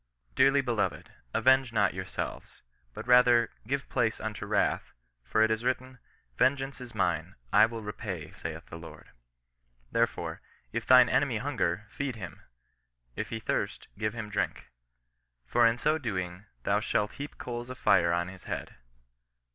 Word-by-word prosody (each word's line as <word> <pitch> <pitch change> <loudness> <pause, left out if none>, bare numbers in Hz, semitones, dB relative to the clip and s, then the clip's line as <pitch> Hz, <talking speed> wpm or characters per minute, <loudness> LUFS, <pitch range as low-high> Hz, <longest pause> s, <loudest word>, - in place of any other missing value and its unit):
" - - -38
Dearly 140 +1 +5
beloved, 115 -6 -1 0.2
avenge 130 - +4
not 105 -4 +2
yourselves; 95 0 -6 0.3
but - - -6
rather 125 -2 +6 0.2
give 140 +2 -1
place 115 -3 0
unto 110 -1 -4
wrath; - - +1 0.3
for 110 - +2
it 110 - +3
is 110 +1 0
written 130 0 -2 0.2
— - - -39
vengeance 135 0 +2
is 120 -2 -9
mine; 85 -4 0 0.2
I 105 +1 +7
will 115 -1 -6
repay, 105 -5 -5
saith - - -6
the 85 - -9
Lord. 80 - -12 0.8
Therefore, - - 0 0.3
if - - -3
thine 125 -1 +8
enemy 130 -4 +2
hunger, 110 -7 -1
feed 140 -3 -3
him; 90 -8 -8 0.7
if - - -3
he 115 - -3
thirst, - - -2
give 110 +2 -2
him 110 -2 -5
drink: 105 - -2 0.7
for 120 - +4
in 115 +1 +2
so 155 +4 +1
doing 95 - -4 0.2
thou 100 +1 +2
shalt 105 0 0
heap 145 +1 -7
coals 120 0 -5
of 130 - -7
fire 90 -7 +4
on 85 +1 0
his 95 0 -11
head. - - -5
110 Hz, 160 wpm, -29 LUFS, 95-125 Hz, 0.8 s, thine